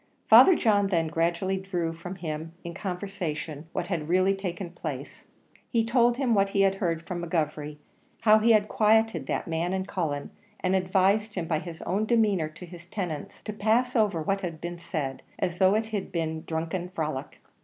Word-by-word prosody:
Father 375 Hz, -, +9 dB
John 205 Hz, -7 st, +3 dB
then 165 Hz, -4 st, +1 dB
gradually 170 Hz, +4 st, 0 dB
drew 180 Hz, -4 st, -2 dB
from 180 Hz, +3 st, -7 dB
him 160 Hz, -2 st, -5 dB
in 170 Hz, -1 st, -6 dB
conversation 175 Hz, -5 st, -4 dB
what -, -, -2 dB
had 165 Hz, -4 st, -3 dB
really 185 Hz, +2 st, +4 dB
taken 185 Hz, -2 st, -5 dB
place. 150 Hz, -6 st, -6 dB, 0.5 s
He 230 Hz, -2 st, +2 dB
told 240 Hz, 0 st, +3 dB
him 255 Hz, -4 st, +2 dB
what 200 Hz, -2 st, +3 dB
he 200 Hz, 0 st, +1 dB
had 195 Hz, -1 st, +4 dB
heard 165 Hz, -3 st, 0 dB
from 175 Hz, -2 st, -4 dB
McGovery 150 Hz, -3 st, -2 dB, 0.4 s
how 215 Hz, -1 st, +6 dB
he 230 Hz, +2 st, +4 dB
had 210 Hz, -1 st, +3 dB
quieted 215 Hz, -9 st, +2 dB
that -, -, -2 dB
man 165 Hz, +2 st, -1 dB
and 190 Hz, 0 st, -2 dB
Cullen 150 Hz, -6 st, -3 dB, 0.3 s
and 185 Hz, 0 st, +1 dB
advised 190 Hz, +3 st, +2 dB
him 180 Hz, -3 st, -2 dB
by 160 Hz, -2 st, 0 dB
his 165 Hz, -1 st, -8 dB
own 210 Hz, +3 st, 0 dB
demeanour 210 Hz, -9 st, +2 dB
to 165 Hz, +3 st, -11 dB
his 175 Hz, 0 st, -12 dB
tenants, 175 Hz, -7 st, -5 dB
to 215 Hz, -, -5 dB
pass 225 Hz, +5 st, +1 dB
over 205 Hz, -8 st, +2 dB
what 195 Hz, +4 st, 0 dB
had 170 Hz, -4 st, -5 dB
been 175 Hz, +1 st, -6 dB
said, 155 Hz, -6 st, -4 dB, 0.2 s
as 175 Hz, 0 st, -2 dB
though 190 Hz, +1 st, +5 dB
it 220 Hz, +1 st, +1 dB
had 205 Hz, -3 st, -3 dB
been 160 Hz, -2 st, -1 dB
a -, -, -8 dB
drunken 165 Hz, +3 st, -3 dB
frolic. 155 Hz, -6 st, -4 dB
180 Hz, 190 wpm, -27 LUFS, 165-200 Hz, 0.5 s, Father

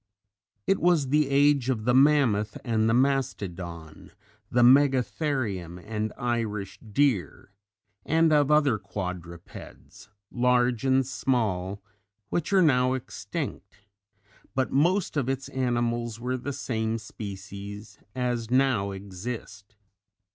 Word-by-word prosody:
It 195 Hz, -, +2 dB
was 165 Hz, -6 st, +2 dB
the 150 Hz, 0 st, +2 dB
age 140 Hz, -2 st, +3 dB
of 110 Hz, -4 st, -1 dB
the 125 Hz, -, +3 dB
mammoth 130 Hz, -7 st, +3 dB
and 110 Hz, -2 st, +1 dB
the -, -, +3 dB
mastodon, 95 Hz, -, -2 dB, 0.4 s
the 120 Hz, 0 st, +3 dB
megatherium 130 Hz, -, +2 dB
and 105 Hz, +3 st, -4 dB
Irish 115 Hz, -5 st, -3 dB
deer 110 Hz, -, -1 dB, 0.5 s
and 160 Hz, 0 st, +3 dB
of 145 Hz, -2 st, +3 dB
other 145 Hz, -7 st, +3 dB
quadrupeds 90 Hz, -1 st, -8 dB, 0.2 s
large 125 Hz, -1 st, +2 dB
and 130 Hz, 0 st, +3 dB
small 105 Hz, -8 st, -1 dB, 0.5 s
which 175 Hz, +3 st, -2 dB
are 190 Hz, -2 st, +5 dB
now 130 Hz, -4 st, +3 dB
extinct; 125 Hz, -4 st, -6 dB, 0.7 s
but 130 Hz, 0 st, 0 dB
most 170 Hz, +5 st, +1 dB
of 135 Hz, -3 st, 0 dB
its 135 Hz, 0 st, -3 dB
animals 120 Hz, -3 st, -1 dB
were 125 Hz, +2 st, -2 dB
the 130 Hz, +3 st, -4 dB
same 110 Hz, -4 st, -2 dB
species 100 Hz, -1 st, -8 dB, 0.2 s
as 120 Hz, -3 st, -2 dB
now 125 Hz, -6 st, +2 dB
exist. 100 Hz, +1 st, -8 dB
120 Hz, 110 wpm, -27 LUFS, 105-135 Hz, 0.7 s, are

